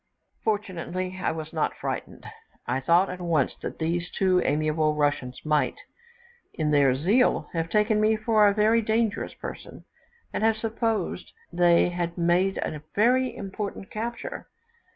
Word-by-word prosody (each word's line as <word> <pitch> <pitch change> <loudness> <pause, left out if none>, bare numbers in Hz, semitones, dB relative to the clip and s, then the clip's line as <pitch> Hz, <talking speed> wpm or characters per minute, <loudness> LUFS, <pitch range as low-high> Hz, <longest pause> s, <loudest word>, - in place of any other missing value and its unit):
Fortunately 185 -3 -3
I - - +1
was 160 0 -6
not 155 - 0
frightened; - - -5 0.4
I - - -1
thought 170 +8 +3
at 180 0 -7
once 165 -6 +1
that - - -5
these 170 +2 -1
two 185 -2 +2
amiable 155 +1 +1
Russians 145 -4 -1
might, 150 -1 +1 0.8
in 155 -3 0
their 140 -3 +4
zeal, 200 - +2
have 165 -1 -2
taken 210 +2 +2
me 215 +1 +4
for 215 -1 +3
a 200 - +3
very 220 +2 +4
dangerous 220 0 -1
person, - - -9 0.5
and - - -2
have 220 0 +3
supposed 225 0 -2 0.2
they 175 0 +4
had 175 -1 -3
made 175 +3 +2
a 150 - -5
very 250 +4 +3
important 200 0 -6
capture. 235 - -5
185 Hz, 145 wpm, -26 LUFS, 160-215 Hz, 0.8 s, their